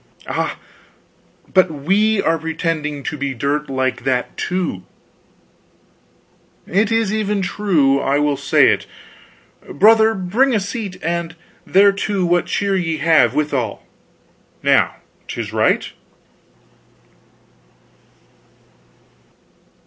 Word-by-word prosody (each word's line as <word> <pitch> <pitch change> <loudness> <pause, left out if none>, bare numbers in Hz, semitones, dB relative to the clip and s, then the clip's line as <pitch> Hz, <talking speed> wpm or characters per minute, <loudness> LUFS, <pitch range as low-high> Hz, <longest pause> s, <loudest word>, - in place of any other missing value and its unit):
"Ah, - - -3 1.0
but 185 -1 +4
we 195 +9 +1
are 165 0 +1
pretending 155 -2 -3
to - - -4
be 140 -1 -3
dirt 145 +4 -2
like 130 -1 -2
that, 125 -2 -1
too." 180 - -3 1.8
"It 205 +4 +1
is 225 -2 +1
even 210 -2 -1
true. 160 -10 +1
I 140 +1 0
will 145 -1 +1
say 140 0 +3
it. - - -1 0.8
Brother, 220 +5 +4
bring 225 +8 +1
a - - +2
seat, 200 -1 -5
and 170 -1 -3 0.3
thereto 200 0 +2
what 175 0 +1
cheer 200 -1 0
ye 165 -4 -1
have, 160 +1 +3
withal. 135 -8 -2 0.8
Now - - +3 0.3
'tis - - -5
right." - - +1
170 Hz, 100 wpm, -19 LUFS, 145-200 Hz, 1.8 s, but